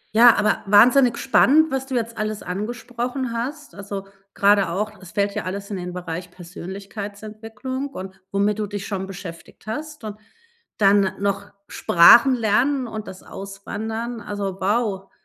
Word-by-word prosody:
Ja, 235 0 +8
aber 210 0 +1
wahnsinnig 240 +5 +6
spannend, 300 +4 +4
was 265 0 -2
du 260 - -3
jetzt 230 -2 -2
alles 215 0 -3
angesprochen 240 +5 -4
hast. 280 +6 -5
Also, 200 0 -6 0.3
grade 200 -3 +4
auch 210 +5 -2
es 185 - -12
fällt 200 0 0
ja - - -2
alles 200 +2 -5
in 200 - -3
den 180 0 -5
Bereich 175 0 -6
Persönlichkeitsentwicklung 210 +8 -7
und 190 -7 -9
womit 205 +1 +1
du 210 - -1
dich 205 -1 -5
schon 190 -2 -4
beschäftigt 180 -3 -10
hast 300 +6 -6
und 210 -1 -6 0.6
dann 200 -1 +4
noch 200 0 -2 0.2
Sprachen 240 +10 +6
lernen 250 +5 +1
und 220 -2 -6
das 185 - -10
Auswandern. 220 +4 -6
Also, 200 -2 -4
wow, 200 -1 -1
210 Hz, 150 wpm, -22 LUFS, 195-235 Hz, 0.6 s, Ja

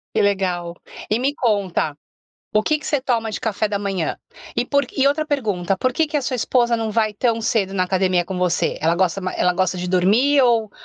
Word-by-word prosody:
Que - - +3
legal. 180 -4 -1 0.3
E 215 - +2
me 275 +3 0
conta, 195 - 0 0.6
o 215 - +4
que 305 +6 +1
que - - -10
você 290 -4 0
toma 230 -4 0
de 215 - -4
café 215 -2 -1
da 205 -1 -1
manhã? 195 -5 -2 0.4
E - - +1
por 280 0 +1
e, 270 - +3
outra 305 +2 +1
pergunta, 200 - -1
por 255 +6 0
que 320 +5 +1
que 300 0 -3
a 290 - 0
sua 255 0 -2
esposa 240 0 +2
não 225 -1 -1
vai 215 0 +1
tão 230 +2 0
cedo 200 -4 0
na 185 - +1
academia 185 -1 +1
com 185 0 -5
você? 180 -1 0
Ela 165 +2 +2
gosta 185 +1 +1
ma 185 0 -3
ela 180 - +2
gosta 185 0 0
de 180 - -4
dormir 210 +11 +3
ou 230 -4 +2
210 Hz, 225 wpm, -21 LUFS, 185-250 Hz, 0.6 s, o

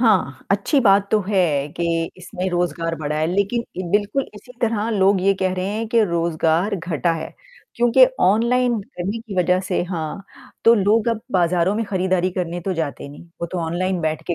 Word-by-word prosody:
हाँ, 200 - +1
अच्छी 205 +9 +2
बात 200 -3 +4
तो 215 - +3
है 160 -8 +1
कि 165 -1 -1
इसमें 185 0 -4
रोज़गार 170 -1 -1
बढ़ा 150 -1 -3
है 155 - +1
लेकिन 200 +6 0 0.3
बिल्कुल 210 +6 0
इसी 230 +4 -13
तरह 225 -1 0
लोग 195 -2 +3
ये 195 +1 +3
कह 185 -1 +1
रहे 185 0 -2
हैं 220 +2 -3
कि 230 0 +3
रोज़गार 170 +2 0
घटा 165 -1 -1
है 165 - -6 0.4
क्योंकि 240 - +5 0.2
ऑनलाइन 235 +3 +2
करने 195 +5 -5
की 225 -3 -9
वजह 180 +1 +3
से 185 -2 -1
हाँ 165 +2 -4 0.4
तो 230 - +7
लोग 215 +2 +2
अब 230 -2 -1
बाज़ारों 175 +1 +2
में 225 +1 -1
खरीदारी 185 -1 0
करने 175 -1 -3
तो 190 +2 -2
जाते 155 -4 -4
नहीं, 145 - -12 0.2
वो 170 - -2
तो 180 +1 -5
ऑनलाइन 180 +2 -1
बैठ 155 -1 -2
के - - +1
185 Hz, 190 wpm, -21 LUFS, 170-210 Hz, 0.4 s, तो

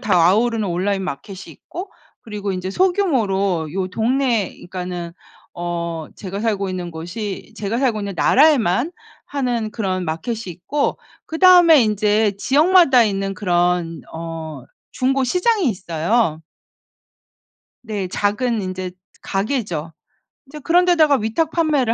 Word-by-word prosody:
다 220 -7 +1
아우르는 220 0 +1
온라인 190 +3 -1
마켓이 185 +3 -6
있고 370 +3 -9 0.3
그리고 205 -3 -4
인제 185 +1 -4
소규모로 200 - +1
요 190 -1 -2
동네 230 0 0
그러니까는 180 -1 -6 0.4
어 170 -2 -4
제가 195 +1 -6
살고 205 -4 -1
있는 180 -2 -4
곳이 190 +6 -6
제가 215 +3 -2
살고 240 -6 +1
있는 200 -1 -4
나라에만 270 - +3 0.3
하는 245 -6 -2
그런 185 -5 -2
마켓이 195 +9 -3
있고 180 - -2 0.3
그다음에 335 -4 +6
인제 210 0 +2
지역마다 290 - +5
있는 195 -1 -2
그런 175 -3 0
어 160 -4 -7 0.3
중고 265 +1 +1
시장이 365 - +2
있어요. 175 -1 0 1.4
네. 205 -5 -4
작은 210 +3 0
인제 185 -1 -5 0.3
가게죠. 195 - -2 0.5
인제 300 +3 -10
그런 350 +5 +3
데다가 315 -5 +4
위탁판매를 290 +1 +1
210 Hz, 275 characters per minute, -20 LUFS, 180-260 Hz, 1.4 s, 그다음에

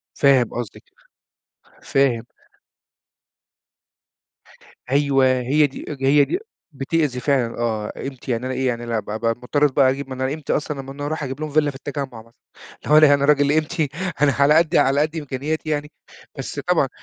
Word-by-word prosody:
فاهم 135 -4 +4
قصدِك. 120 -5 -6 1.0
فاهم. 130 -4 +1 2.7
أيوة، 140 -1 +3
هي 145 +4 +2
دي 135 - -10
اج 135 -2 -7
هي 145 +1 +5
دي 360 - -2 0.4
بتأذي 140 -1 -1
فعلًا 125 -4 0
آه، 110 -3 -2
قيمتي 135 -2 -6
يعني 115 +2 -2
أنا 130 - -2
إيه 130 0 -1
يعني 120 -1 -2
لا 115 -1 -1
بقي 105 +1 -6
أبقي 115 +1 0
مضطر 145 +4 +1
بقى 135 -1 +4
أجيب 135 0 -5
من 130 0 -6
قيمتي 140 +3 -2
أصلًا 150 -2 -2
لمّا 135 - -10
أنا 145 +1 -6
أروح 155 0 -3
أجيب 135 +1 -5
لهم 155 - -3
فيلا 150 0 +2
في - - -17
التجمُّع 135 -4 -6
مثلًا. 115 +1 -22 0.5
اللي 150 - 0 0.2
هو - - +6
أنا 140 - 0
راجل 145 -1 +3
قيمتي 155 0 0 0.3
أنا 145 -1 +5
على 140 +2 +5
قدّي 160 0 +3
على 135 +2 +3
قد 155 +2 -1
إمكانياتي 150 +2 -3
يعني. 150 0 -2 0.5
بس - - -5
طبعًا - - +1
140 Hz, 175 wpm, -21 LUFS, 130-150 Hz, 2.7 s, هو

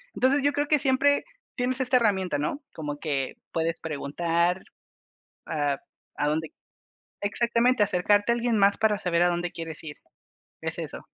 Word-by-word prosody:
Entonces, 275 +3 +3
yo 285 - +3
creo 290 0 0
que 300 - +5
siempre 285 +1 +3 0.3
tienes 250 +1 -1
esa 255 0 +3
herramienta, 195 -8 +1
¿no?, 150 - -2
como 145 -2 -5
que 140 -4 -1 0.2
puedes 165 0 -1
preguntar 170 +4 0 0.9
a 145 -3 0 0.4
a 145 - 0
donde 155 +1 -1 0.7
Exactamente, 235 +3 +2
acercarte 205 +4 +2
a - - +3
alguien 235 -2 +1
más 200 0 +4
para 215 -2 +2
saber 175 -3 +1
a - - +4
dónde 175 0 -2
quieres 165 -2 -6
ir. 150 -2 -7 0.7
Es - - -3
eso. - - -7
190 Hz, 155 wpm, -26 LUFS, 160-245 Hz, 0.9 s, que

